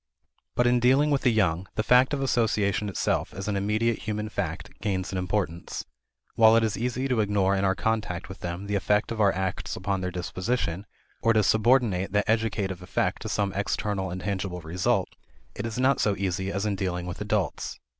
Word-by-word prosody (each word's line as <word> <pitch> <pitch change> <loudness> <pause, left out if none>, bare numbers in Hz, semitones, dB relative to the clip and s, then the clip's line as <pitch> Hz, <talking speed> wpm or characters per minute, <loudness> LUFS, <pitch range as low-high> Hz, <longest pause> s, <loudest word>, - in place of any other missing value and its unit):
But 120 - +3
in 120 0 +4
dealing 135 +5 +4
with 140 - +2
the 125 - +4
young, 95 -5 +1
the 110 - 0
fact 125 +3 +5
of 140 -2 -1
association 105 -5 +1
itself 100 - -1
as 95 +2 -5
an 105 - 0
immediate 110 +3 +1
human 105 0 -3
fact, - - -4
gains 95 -3 -1
in 95 - -3
importance. 90 -2 -2 0.5
While 110 -1 +6
it 115 - +4
is 110 -1 0
easy 125 +3 -1
to 125 -4 +1
ignore 100 -2 +2
in 95 - 0
our 95 -1 +2
contact 105 -3 -2
with 95 - -9
them 90 +2 -5
the 100 - -3
effect 105 +2 +1
of 110 -1 -1
our 100 -2 +5
acts 95 -1 -3
upon 95 0 -2
their 90 - -1
disposition, 90 +1 -2 0.3
or 115 - +4
to 110 -1 +3
subordinate 110 -3 +3
that 105 0 +2
educative 105 -4 0
effect 90 - -1
to - - -5
some 100 -2 0
external 100 -1 -1
and 90 +1 -5
tangible 95 -1 -3
result, 85 +3 0 0.4
it - - -4
is 115 - -5
not 130 +1 +3
so 105 -2 +2
easy 95 0 -1
as 100 +1 -2
in 105 -2 0
dealing 90 -2 -2
with 90 - -6
adults. - - -2
100 Hz, 200 wpm, -26 LUFS, 95-115 Hz, 0.5 s, While